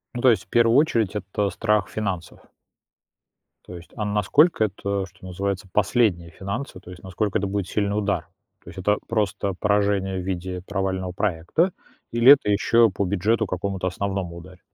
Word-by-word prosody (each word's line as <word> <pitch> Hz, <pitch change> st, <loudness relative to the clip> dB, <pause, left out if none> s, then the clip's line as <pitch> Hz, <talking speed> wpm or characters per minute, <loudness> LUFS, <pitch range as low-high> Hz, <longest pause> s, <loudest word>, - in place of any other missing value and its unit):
Ну, 120 Hz, -, -3 dB
то 130 Hz, -, +6 dB
есть, 115 Hz, -, +2 dB
в -, -, -28 dB
первую 120 Hz, +1 st, +4 dB
очередь, 115 Hz, -, +2 dB
это 100 Hz, 0 st, -2 dB
страх 105 Hz, 0 st, 0 dB
финансов. 95 Hz, -7 st, -4 dB, 1.3 s
То 90 Hz, -, -9 dB
есть, 85 Hz, -, -14 dB
а 110 Hz, -, -3 dB
насколько 105 Hz, -, +3 dB
это, 100 Hz, -1 st, -3 dB
что 90 Hz, -1 st, -16 dB
называется, 95 Hz, +2 st, -3 dB
последние 100 Hz, -5 st, +1 dB
финансы? 100 Hz, +5 st, -5 dB
То 90 Hz, -, -12 dB
есть 90 Hz, -, -11 dB
насколько 100 Hz, +3 st, -1 dB
это 100 Hz, -, -2 dB
будет 100 Hz, -1 st, -2 dB
сильный 100 Hz, -1 st, -1 dB
удар? 100 Hz, -1 st, -1 dB, 0.4 s
То -, -, -12 dB
есть -, -, -13 dB
это 105 Hz, +3 st, +1 dB
просто 100 Hz, -3 st, -1 dB
поражение 100 Hz, -1 st, +1 dB
в -, -, -7 dB
виде 90 Hz, -1 st, -4 dB
провального 95 Hz, -2 st, -2 dB
проекта, 95 Hz, -, 0 dB, 0.4 s
или 120 Hz, +3 st, +7 dB
это 140 Hz, -7 st, 0 dB
еще 115 Hz, +3 st, +4 dB
по 100 Hz, +1 st, -2 dB
бюджету 105 Hz, +4 st, +1 dB
какому-то 95 Hz, 0 st, -3 dB
основному 95 Hz, -2 st, -3 dB
ударит? 90 Hz, +1 st, -13 dB
100 Hz, 170 wpm, -23 LUFS, 95-105 Hz, 1.3 s, или